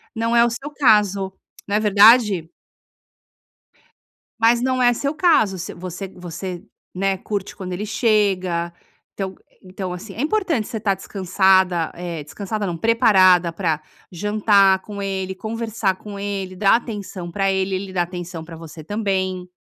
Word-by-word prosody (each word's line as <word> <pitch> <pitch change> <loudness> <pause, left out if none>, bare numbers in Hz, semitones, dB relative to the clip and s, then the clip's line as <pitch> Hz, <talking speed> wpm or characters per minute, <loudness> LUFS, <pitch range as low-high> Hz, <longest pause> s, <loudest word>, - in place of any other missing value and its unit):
Não 230 +1 0
é 235 - +6
o 235 - +3
seu 270 +5 -6
caso, 210 -8 +3 0.4
não 200 - -1
é - - +3
verdade? 210 -4 +5 1.9
Mas 230 +1 +4
não 255 0 0
é 245 -1 +5
seu 280 +4 -2
caso. 305 - +3
Se 180 - -6
você 180 +2 -7
você, 180 0 -7 0.3
né, 195 +1 0
curte 200 0 -5
quando 185 -2 -6
ele 195 +4 -4
chega, 190 -7 +1 0.4
então 190 -1 -5 0.3
então 185 0 -5
assim, 195 +3 -8
é - - -10
importante 320 - 0
você 225 - -4
estar 205 -2 +1
descansada, 190 -3 +2
é 170 -2 -5
descansada 200 +7 -4
não, 175 - -3
preparada 185 -5 +4
para 165 -4 -1 0.3
jantar 200 0 +3
com 205 0 -8
ele, 190 -1 -3
conversar 220 -1 -2
com 200 +1 -9
ele, 195 -2 -4
dar 195 +2 +4
atenção 205 -6 -5
pra 195 +2 +1
ele. 190 0 0
Ele 190 0 -5
dá 180 - +1
atenção 175 -1 -7
pra 165 0 -10
você 160 -1 -10
também. 190 -1 -2
195 Hz, 155 wpm, -21 LUFS, 180-215 Hz, 1.9 s, é